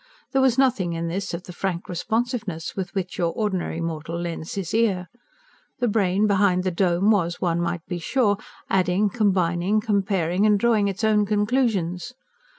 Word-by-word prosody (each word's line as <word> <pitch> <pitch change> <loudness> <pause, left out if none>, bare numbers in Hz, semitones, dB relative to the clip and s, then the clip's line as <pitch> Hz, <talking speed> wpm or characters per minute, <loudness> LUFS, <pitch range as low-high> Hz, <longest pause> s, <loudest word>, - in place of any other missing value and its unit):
There 270 - +2
was 260 -2 +3
nothing 220 -10 +2
in 165 0 -3
this 190 +3 -3
of 170 +1 -5
the 180 - -10
frank 180 -1 -3
responsiveness 220 -2 -2
with 190 0 -5
which 185 -1 -3
your 170 -1 +1
ordinary 190 -6 -2
mortal 165 0 -4
lends 170 -2 -5
his 190 -5 -4
ear. 200 -6 +1 0.7
The 245 - 0
brain 200 -2 +2
behind 195 -3 +3
the 185 - 0
dome 180 +3 +2
was, 175 -5 +1
one 170 -1 0
might 170 -1 -2
be 175 -2 -4
sure, 205 +1 +1 0.3
adding, 190 +2 +2
combining, 190 -2 +1
comparing, 195 -4 0
and 210 -1 +4
drawing 220 -2 +3
its 200 +3 -4
own 210 -1 +3
conclusions. 210 -3 0
190 Hz, 165 wpm, -24 LUFS, 175-210 Hz, 0.7 s, and